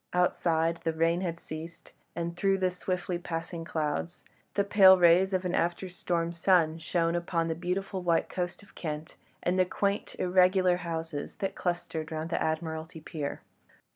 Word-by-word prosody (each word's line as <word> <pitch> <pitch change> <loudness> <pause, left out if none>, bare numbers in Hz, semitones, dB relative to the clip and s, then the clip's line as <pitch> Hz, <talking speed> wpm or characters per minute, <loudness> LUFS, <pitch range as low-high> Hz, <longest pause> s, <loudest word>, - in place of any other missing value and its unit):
Outside 170 -2 +2
the 165 - 0
rain 165 +2 +2
had 170 -2 -3
ceased, 165 +1 -8 0.2
and 170 0 -3
through 195 +2 +2
the 185 -1 +1
swiftly 180 -1 -3
passing 165 0 -5
clouds, 160 +1 -3 0.3
the 200 - +3
pale 195 -2 +7
rays 180 +2 +5
of 185 -1 0
an 180 - -1
after 175 +2 0
storm 170 -1 -1
sun 165 -2 +3
shone 165 0 0
upon 170 -1 -1
the - - +1
beautiful 185 +3 -3
white 170 -2 +2
coast 180 +2 -4
of - - -19
Kent 155 -1 -5 0.3
and 180 +1 +1
the - - +7
quaint, 200 +3 -1
irregular 185 0 +4
houses 165 -3 -4
that 195 - -3
clustered 175 -2 -3
round 160 +1 -4
the - - 0
Admiralty 160 +1 -3
Pier. 150 -2 -5
170 Hz, 165 wpm, -29 LUFS, 165-180 Hz, 0.3 s, pale